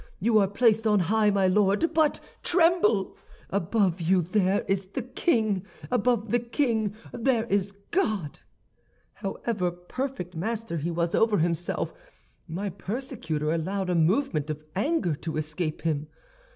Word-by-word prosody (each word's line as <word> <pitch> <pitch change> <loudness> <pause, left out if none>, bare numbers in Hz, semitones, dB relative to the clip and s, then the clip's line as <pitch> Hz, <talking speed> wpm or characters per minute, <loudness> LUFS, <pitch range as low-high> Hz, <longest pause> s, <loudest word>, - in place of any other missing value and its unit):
You 220 +2 +4
are 195 - +3
placed 220 +2 +3
on 210 -1 +4
high, 210 +4 +3
my 200 -1 +2
Lord, 205 - +3
but 315 -2 +3 0.2
tremble! 335 - +3 0.4
Above 195 -1 +1
you 180 +2 +3
there 190 +2 +1
is 195 -1 0
the 230 +6 -4
king; 220 - +1 0.3
above 235 -3 +1
the 240 - +3
king 230 -4 0 0.2
there 235 -1 +1
is 200 -3 0 0.2
God!' 215 - 0 0.7
"However 195 -1 -2
perfect 180 +2 -5
master 215 +1 -3
he 160 +3 -2
was 170 0 -1
over 225 -2 +3
himself, 170 +1 -1 0.5
my 190 +4 -3
persecutor 190 - -3
allowed 185 +3 -1
a - - +1
movement 165 - +1
of 155 0 -4
anger 205 - +1
to 160 0 -4
escape 155 +1 -3
him. 155 -2 -1
200 Hz, 140 wpm, -27 LUFS, 175-230 Hz, 0.7 s, You